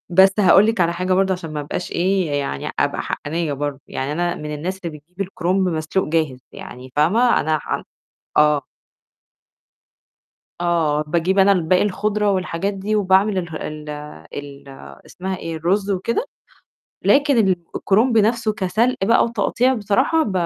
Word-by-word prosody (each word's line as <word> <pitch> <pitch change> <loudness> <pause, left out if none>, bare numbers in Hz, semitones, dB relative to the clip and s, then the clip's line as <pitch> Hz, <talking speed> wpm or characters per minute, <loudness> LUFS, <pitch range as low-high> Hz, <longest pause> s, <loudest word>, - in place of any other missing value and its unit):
بس 190 +2 +6
هاقول 195 +1 +6
لِك 225 -3 0
على 170 -1 +3
حاجة 180 +2 -1
برضه 190 +1 +2
عشان 175 -4 -5
ما 150 - -3
أبقاش 145 +4 -5
إيه 185 -1 +1
يعني 140 - -4
أبقى - - 0
حقانيّة 160 0 -3
برضه، 145 0 -4
يعني 135 +3 -4
أنا 175 +2 -1
من 150 0 -6
الناس 185 +6 -4
اللي 155 -3 -5
بتجيب 180 +6 -19
الكرنب 185 0 0
مسلوق 160 +3 -1
جاهز، 155 -5 0
يعني 125 +1 -10
فاهمة 215 +12 +3
أنا 155 +1 0
حن - - -4 0.5
آه. 150 -2 +4 2.0
آه 165 -4 +1
باجيب 170 +5 0
أنا 195 +1 +6
الباقي 180 -1 +2
الخُضرة 210 +1 0
والحاجات 185 +1 -1
دي 200 +2 -2
وباعمل 195 0 +3
اله 170 -3 -4
ال 150 -1 -6 0.4
ال 140 -1 -8 0.4
اسمها 190 0 -5
إيه 165 -2 -5
الرز 195 +5 0
وكده، 230 - -1 0.8
لكن 280 -2 +4 0.4
الكرنب 225 +4 +2
نَفْسه 220 +1 +2
كسلق 215 +5 0
بقى 230 +3 +4
وتقطيع 245 +2 +1
بصراحة 255 +9 +1
ب 210 - -3
185 Hz, 150 wpm, -20 LUFS, 155-200 Hz, 2.0 s, بس